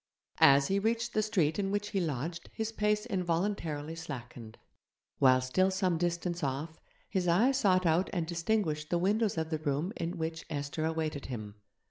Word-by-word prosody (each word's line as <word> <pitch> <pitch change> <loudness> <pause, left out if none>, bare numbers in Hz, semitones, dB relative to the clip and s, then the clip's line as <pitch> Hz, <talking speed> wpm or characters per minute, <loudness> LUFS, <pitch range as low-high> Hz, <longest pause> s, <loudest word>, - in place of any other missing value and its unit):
As 140 0 +7
he 195 +1 +1
reached 230 +3 0
the 215 - +2
street 190 -7 +1
in 195 -1 0
which 205 +1 -1
he 195 -3 0
lodged 165 +2 -3
his 220 0 -3
pace 210 0 0
involuntarily 170 -6 -1
slackened. 120 -8 -8 0.6
While 130 -1 +5
still 185 +10 +2
some 185 -3 0
distance 175 0 -1
off, 145 +4 -3 0.3
his 185 -3 -1
eye 200 +10 +4
sought 190 -9 +2
out 165 +3 +2
and 175 -4 -1
distinguished 165 -3 -1
the 175 - +2
windows 205 +3 +1
of 160 0 -2
the 155 - -1
room 150 +6 -1
in 170 +2 -3
which 160 0 -3
Esther 145 +1 -3
awaited 160 -3 -2
him. 110 -5 -6
170 Hz, 170 wpm, -31 LUFS, 150-195 Hz, 0.6 s, As